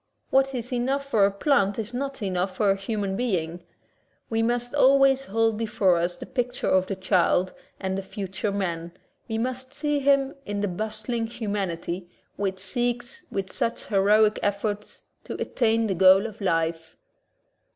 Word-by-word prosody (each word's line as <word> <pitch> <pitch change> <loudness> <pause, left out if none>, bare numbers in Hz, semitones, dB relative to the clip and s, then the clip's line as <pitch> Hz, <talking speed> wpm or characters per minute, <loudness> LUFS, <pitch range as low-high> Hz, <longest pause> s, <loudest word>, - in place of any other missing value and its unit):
What 270 0 +3
is 245 +1 -4
enough 265 +3 0
for 220 -7 +3
a 200 - +2
plant 200 -2 +2
is 225 +1 -4
not 275 -1 -4
enough 185 -1 -1
for 205 -2 +3
a - - +2
human 195 -1 -2
being. 180 -7 -1 0.7
We 225 0 +1
must 240 +2 0
always 270 -1 +5
hold 225 0 +1
before 205 -5 +2
us 175 +1 -1
the - - -9
picture 245 -1 -2
of 185 0 +3
the 195 - -2
child 185 -1 +2 0.3
as 190 -1 -2
the 195 - -2
future 195 +1 -4
man, 170 -4 -3 0.3
we 220 -2 -2
must 255 +3 -4
see 295 0 0
him 275 0 +3
in 205 -5 -3
the 205 - +1
bustling 220 +4 -3
humanity 190 -6 -3 0.3
which 195 -1 -2
seeks 240 +5 -2
with 195 -1 -3
such 230 - -1
heroic 210 +1 +3
efforts 205 +1 -2 0.2
to - - -6
attain 230 -2 +1
the 200 - 0
goal 190 +3 +6
of 220 -1 -7
life. 165 -3 -1
210 Hz, 160 wpm, -25 LUFS, 190-245 Hz, 0.7 s, goal